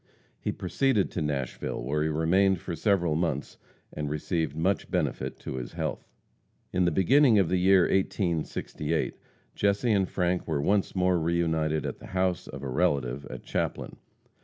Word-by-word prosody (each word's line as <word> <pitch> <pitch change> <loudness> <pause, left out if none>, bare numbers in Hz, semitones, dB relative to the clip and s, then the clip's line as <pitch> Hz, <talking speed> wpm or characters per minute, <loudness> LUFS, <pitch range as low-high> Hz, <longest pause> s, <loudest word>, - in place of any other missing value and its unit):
He - - -2
proceeded 135 -8 0
to 90 - -3
Nashville, 70 -6 -3
where 75 +5 -1
he 80 - +1
remained 90 +5 +3
for 85 0 -5
several 85 -1 +2
months, 80 -4 -2 0.3
and 75 -1 -3
received 80 +1 -2
much 90 +5 0
benefit - - -2
to 65 - -5
his - - -6
health. - - -4 0.7
In 90 0 +2
the 85 - +3
beginning 115 - +5
of 95 -5 +3
the 90 - +2
year 95 +1 +5
1868 85 -3 -1 0.4
Jesse 100 +4 +1
and 95 -3 +2
Frank 90 -1 0
were 80 -3 0
once 100 +8 +1
more 90 -1 +2
re 85 +1 0
united 80 -3 0
at - - -4
the - - -11
house 90 -1 0
of 70 0 -8
a - - -3
relative 70 -3 0
at 65 - -8
Chaplin. - - -3
85 Hz, 165 wpm, -28 LUFS, 75-95 Hz, 0.7 s, beginning